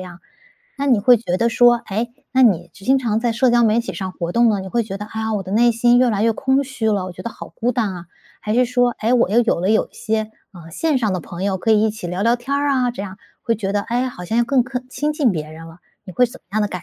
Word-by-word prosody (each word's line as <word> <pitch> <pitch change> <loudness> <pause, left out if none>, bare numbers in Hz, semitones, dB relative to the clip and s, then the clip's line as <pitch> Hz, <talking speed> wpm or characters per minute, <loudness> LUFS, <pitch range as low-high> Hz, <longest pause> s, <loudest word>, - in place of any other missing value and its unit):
样， 180 -1 -10 0.6
那 280 - -1
你 245 -6 +3
会 245 +3 +6
觉 195 -5 -2
得 235 +4 +1
说， 240 +1 +5
诶， 230 +4 -2 0.2
那 260 - +4
你 185 -8 +3
就 195 - -15
经 270 +1 +4
常 225 -4 0
在 235 -1 0
社 245 +2 +2
交 240 0 +4
媒 220 +1 +3
体 235 - -6
上 190 -1 -5
活 170 -2 -4
动 235 +2 +4
了， 205 -3 +1
你 190 - -7
会 235 +2 0
觉 195 -2 -6
得， 210 +1 -7
哎 220 +1 -6
呀， 220 0 -2
我 200 - -2
的 190 - -9
内 235 +2 +4
心 240 +2 +3
越 250 0 +4
来 210 -2 0
越 230 - +3
空 265 +4 +1
虚 250 -5 -3
了， 200 -3 0
我 185 - -7
觉 - - -10
得 235 - -5
好 - - -10
孤 245 +2 -2
单 220 -4 -1
啊， 175 -1 -9 0.3
还 210 - -2
是 250 +1 +4
说， 245 0 +1
诶， 225 +3 +1
我 245 -5 +3
又 220 +5 +3
有 230 -7 0
了 185 +3 +1
有 220 - +2
一 - - -39
些， 220 0 -2 0.2
呃， 165 -3 -13
线 300 - 0
上 220 -5 0
的 185 - -1
朋 170 +2 -8
友 195 -1 -1
可 225 - +1
以 215 -1 +4
一 220 - +2
起 215 -3 -7
聊 180 +3 -3
聊 235 +3 +3
天 265 +4 -3
儿 285 0 0
啊 255 -2 +1
这 200 - -6
样， 195 0 -8 0.2
会 230 - 0
觉 195 -2 -3
得， 205 - +1
哎 235 +3 -2
呀 260 - -1
好 180 -8 -9
像 220 +6 -1
要 240 - +3
克 260 +1 +2
更 250 0 -6
亲 295 +3 -2
近 285 -7 +1
别 155 -3 -5
人 165 +1 -11
了， 165 +1 -14 0.3
你 185 - -9
会 250 - +3
怎 240 - -14
么 - - -54
样 215 - +1
的 210 - 0
感 180 -3 -6
225 Hz, 340 characters per minute, -20 LUFS, 195-245 Hz, 0.6 s, 会